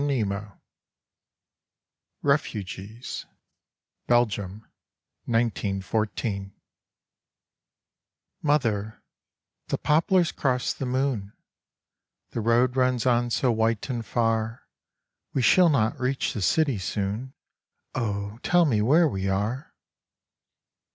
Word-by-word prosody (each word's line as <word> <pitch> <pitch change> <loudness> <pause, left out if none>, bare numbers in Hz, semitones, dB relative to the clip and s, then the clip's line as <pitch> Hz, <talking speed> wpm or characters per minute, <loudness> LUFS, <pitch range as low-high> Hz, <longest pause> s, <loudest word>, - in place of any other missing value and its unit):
24 105 -7 -2 1.6
REFUGEES 110 -5 -2 0.8
Belgium 105 -4 +1 0.3
— - - -56
1914 110 -1 -1
11 95 0 -12 1.9
Mother, 115 -8 0 0.6
the - - -1
poplars 170 +3 +3
cross 125 -2 0
the 135 - -4
moon; 125 -6 -1 1.0
The 115 - -2
road 120 +3 +3
runs 125 -2 +2
on 120 -1 +3
so 125 +1 +2
white 115 +2 0
and 120 -2 -3
far, 115 0 -1 0.7
We 130 - +2
shall 180 +7 +6
not 115 -7 +1
reach 130 +1 0
the 105 - -4
city 135 - +2
soon, 105 - -3 0.6
Oh, 100 -1 -3
tell 175 -1 +4
me 115 -8 +2
where 155 +10 +5
we 95 -7 -2
are 105 +9 -2
115 Hz, 95 wpm, -26 LUFS, 105-130 Hz, 1.9 s, shall